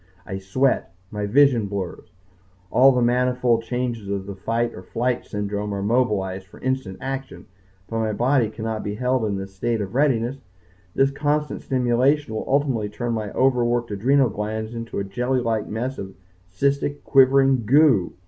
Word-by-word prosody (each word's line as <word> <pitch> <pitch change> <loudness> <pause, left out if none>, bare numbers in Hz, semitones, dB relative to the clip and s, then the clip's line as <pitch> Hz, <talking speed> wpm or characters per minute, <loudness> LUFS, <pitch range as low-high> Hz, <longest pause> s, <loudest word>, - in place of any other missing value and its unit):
I 95 +1 -5
sweat. 95 0 0 0.2
My 105 -1 -3
vision 125 -2 +4
blurs. 95 -5 -5 0.6
All 135 +2 +6
the 125 -2 +1
manifold 125 -1 +2
changes 115 -3 -3
of 100 -1 -2
the 100 - -6
fight 115 +5 -1
or - - -9
flight 120 +6 -2
syndrome 105 0 -3
are 100 - -3
mobilized 100 -5 0
for - - -15
instant 130 -7 -2
action. 135 0 -6 0.4
But 115 - -3
my 110 -1 0
body 120 +1 +2
cannot 110 0 -4
be 105 0 -3
held 125 0 0
in 100 -2 -1
this 95 0 -7
state 115 +4 -1
of 100 -2 -4
readiness. 130 -2 +1 0.6
The 135 0 +3
constant 150 +1 -1
stimulation 130 +2 +1
will 110 - -3
ultimately 130 -7 +1
turn 120 +3 -3
my 110 -2 -3
overworked 120 -3 +1
adrenal 130 +6 +3
glands 110 +2 -4
into 115 0 -6
a 100 - -1
jelly 125 +6 -1
like 115 -3 -1
mess 125 +5 -3
of 95 0 -7 0.4
cystic 140 +6 -1
quivering 135 -3 +4
goo. 130 - +4
120 Hz, 165 wpm, -23 LUFS, 105-130 Hz, 0.6 s, All